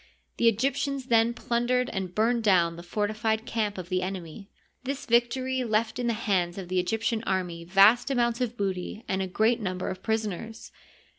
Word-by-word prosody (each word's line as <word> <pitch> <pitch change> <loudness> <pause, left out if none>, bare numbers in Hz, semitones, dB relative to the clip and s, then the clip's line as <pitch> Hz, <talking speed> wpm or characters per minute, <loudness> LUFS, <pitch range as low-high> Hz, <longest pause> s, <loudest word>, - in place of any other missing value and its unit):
The 235 - +3
Egyptians 275 +4 0
then 230 0 +3
plundered 250 +1 0
and 190 -3 -4
burned 230 +2 +2
down 175 -5 +3
the 170 - -9
fortified 215 +4 -1
camp 215 -4 -2
of 180 -1 -7
the 185 -1 0
ene 185 -1 -3
my. 165 +5 -11 0.4
This 275 +1 -4
victory 255 +1 +1
left 220 +1 0
in 245 - -1
the 235 - +2
hands 190 -6 0
of 185 -3 -7
the 185 0 +1
Egyptian 225 +4 -1
army 180 -3 -2
vast 200 +8 +5
amounts 240 -2 +1
of 240 -1 -2
booty 195 +2 -3
and 190 0 -1
a 190 - -2
great 220 +5 +2
number 185 -2 -3
of 185 0 -7
prisoners. 220 0 -3
220 Hz, 180 wpm, -27 LUFS, 185-235 Hz, 0.4 s, vast